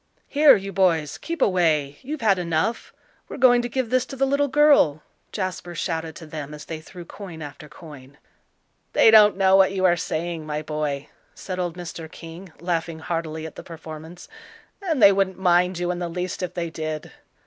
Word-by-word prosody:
"Here, 295 Hz, 0 st, +6 dB
you 195 Hz, -1 st, -5 dB
boys, 165 Hz, -6 st, +1 dB
keep 335 Hz, -4 st, -2 dB
away; 155 Hz, -7 st, +1 dB
you've 300 Hz, +2 st, -6 dB
had 200 Hz, -4 st, +3 dB
enough; 170 Hz, +6 st, -1 dB, 0.4 s
we're -, -, -7 dB
going 245 Hz, -2 st, +5 dB
to 240 Hz, -, -4 dB
give 255 Hz, -2 st, -2 dB
this 255 Hz, -1 st, +3 dB
to -, -, -8 dB
the 270 Hz, +1 st, +1 dB
little 280 Hz, +1 st, +1 dB
girl," 280 Hz, -, +4 dB, 0.3 s
Jasper 185 Hz, -3 st, -4 dB
shouted 160 Hz, -1 st, -3 dB
to 165 Hz, -, -10 dB
them 150 Hz, -1 st, -7 dB
as 150 Hz, -, -11 dB
they 160 Hz, -1 st, -6 dB
threw 175 Hz, +2 st, -11 dB
coin 170 Hz, -4 st, -9 dB
after 150 Hz, +1 st, -10 dB
coin. 145 Hz, -4 st, -13 dB, 0.8 s
"They 225 Hz, -, +6 dB
don't 210 Hz, -2 st, +7 dB
know 190 Hz, -1 st, +4 dB
what 195 Hz, 0 st, +5 dB
you 190 Hz, -1 st, 0 dB
are 175 Hz, -1 st, +5 dB
saying, 165 Hz, 0 st, -3 dB
my 150 Hz, 0 st, -4 dB
boy," 150 Hz, -2 st, -3 dB, 0.3 s
said 185 Hz, -1 st, -6 dB
old 175 Hz, -1 st, -3 dB
Mr. 165 Hz, -2 st, -8 dB
King, 165 Hz, +2 st, -11 dB
laughing 170 Hz, -1 st, -2 dB
heartily 160 Hz, -1 st, -4 dB
at 160 Hz, -, -9 dB
the -, -, -8 dB
performance, 160 Hz, +1 st, -10 dB, 0.5 s
"and 320 Hz, -, 0 dB
they 200 Hz, -, +10 dB
wouldn't 195 Hz, -1 st, 0 dB
mind 180 Hz, -1 st, +2 dB
you 175 Hz, 0 st, -1 dB
in 175 Hz, -, -4 dB
the 175 Hz, -1 st, -3 dB
least 180 Hz, +2 st, -4 dB
if 180 Hz, -, -4 dB
they 170 Hz, -2 st, -3 dB
did." 155 Hz, -1 st, -5 dB
175 Hz, 190 wpm, -23 LUFS, 160-195 Hz, 0.8 s, they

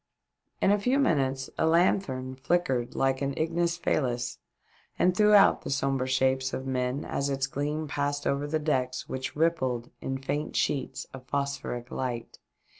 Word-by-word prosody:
In 195 Hz, -, +5 dB
a 205 Hz, -, +3 dB
few 250 Hz, +7 st, +2 dB
minutes 135 Hz, -, +1 dB
a 160 Hz, -, +3 dB
lanthorn 160 Hz, -6 st, +2 dB
flickered 130 Hz, -3 st, 0 dB
like 135 Hz, 0 st, +1 dB
an 140 Hz, 0 st, -1 dB
ignis 170 Hz, +1 st, 0 dB
fahms 125 Hz, -, -1 dB, 0.6 s
and 180 Hz, 0 st, +3 dB
threw 210 Hz, +1 st, +6 dB
out 200 Hz, -, +6 dB
the -, -, -6 dB
sombre 135 Hz, -2 st, 0 dB
shapes 130 Hz, 0 st, +1 dB
of 130 Hz, -, -3 dB
men 130 Hz, +1 st, -1 dB
as 140 Hz, 0 st, -1 dB
its 135 Hz, -1 st, 0 dB
gleam 150 Hz, +3 st, -2 dB
passed 145 Hz, 0 st, -2 dB
over 140 Hz, +1 st, 0 dB
the 155 Hz, +2 st, 0 dB
decks 130 Hz, -4 st, -1 dB
which 130 Hz, 0 st, -4 dB
rippled 130 Hz, -7 st, 0 dB
in 135 Hz, 0 st, -2 dB
faint 145 Hz, +3 st, -3 dB
sheets 140 Hz, -, -1 dB
of 130 Hz, -1 st, -10 dB
phosphoric 140 Hz, -3 st, -3 dB
light. 120 Hz, -3 st, -4 dB
135 Hz, 160 wpm, -28 LUFS, 130-155 Hz, 0.6 s, threw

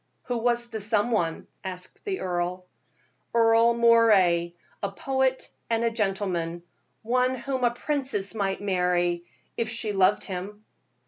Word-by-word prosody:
"Who 245 Hz, -1 st, -2 dB
was 240 Hz, 0 st, 0 dB
the 220 Hz, -, -4 dB
some 210 Hz, +3 st, +1 dB
one?" 170 Hz, -7 st, 0 dB, 0.2 s
asked 185 Hz, -, -7 dB
the 390 Hz, -2 st, -2 dB
earl. 180 Hz, 0 st, -2 dB, 0.7 s
"Earle 230 Hz, 0 st, +5 dB
Moray, 210 Hz, -8 st, +4 dB, 0.3 s
a 200 Hz, -, -2 dB
poet 265 Hz, +4 st, 0 dB, 0.2 s
and 230 Hz, 0 st, +1 dB
a 230 Hz, -, +2 dB
gentleman 190 Hz, -6 st, -2 dB, 0.4 s
one 250 Hz, +3 st, +1 dB
whom 260 Hz, +1 st, -3 dB
a 240 Hz, -, +5 dB
princess 260 Hz, -6 st, -2 dB
might 195 Hz, -3 st, -2 dB
marry, 180 Hz, -3 st, +1 dB, 0.3 s
if 230 Hz, -1 st, -1 dB
she 225 Hz, -3 st, -2 dB
loved 195 Hz, +1 st, +3 dB
him." 200 Hz, +3 st, -6 dB
215 Hz, 135 wpm, -26 LUFS, 185-235 Hz, 0.7 s, Earle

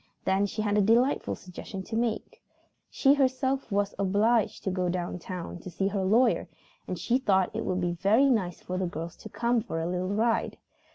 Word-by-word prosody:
Then 195 Hz, +2 st, +2 dB
she 215 Hz, +2 st, -3 dB
had 205 Hz, 0 st, +2 dB
a -, -, +5 dB
delightful 235 Hz, +7 st, +2 dB
suggestion 190 Hz, +1 st, -8 dB
to 220 Hz, -, -6 dB
make. 230 Hz, -1 st, -2 dB, 0.5 s
She 275 Hz, 0 st, +4 dB
herself 265 Hz, -2 st, 0 dB
was 200 Hz, 0 st, 0 dB
obliged 205 Hz, +4 st, +2 dB
to 190 Hz, -, -1 dB
go 180 Hz, -1 st, 0 dB
down 180 Hz, 0 st, -3 dB
town 180 Hz, 0 st, -6 dB
to 185 Hz, -, -8 dB
see 195 Hz, +3 st, -1 dB
her 200 Hz, -1 st, -1 dB
lawyer 230 Hz, +6 st, +3 dB, 0.4 s
and -, -, -3 dB
she 245 Hz, +2 st, +1 dB
thought 190 Hz, -7 st, +1 dB
it -, -, -2 dB
would 185 Hz, 0 st, 0 dB
be 175 Hz, 0 st, 0 dB
very 200 Hz, +10 st, +3 dB
nice 185 Hz, -8 st, -1 dB
for 185 Hz, 0 st, -4 dB
the 185 Hz, -, 0 dB
girls 165 Hz, 0 st, -6 dB
to -, -, -10 dB
come 235 Hz, 0 st, +1 dB
for 200 Hz, -7 st, -4 dB
a 165 Hz, -, -2 dB
little 180 Hz, +1 st, -2 dB
ride. 225 Hz, +2 st, 0 dB
200 Hz, 205 wpm, -28 LUFS, 185-230 Hz, 0.5 s, a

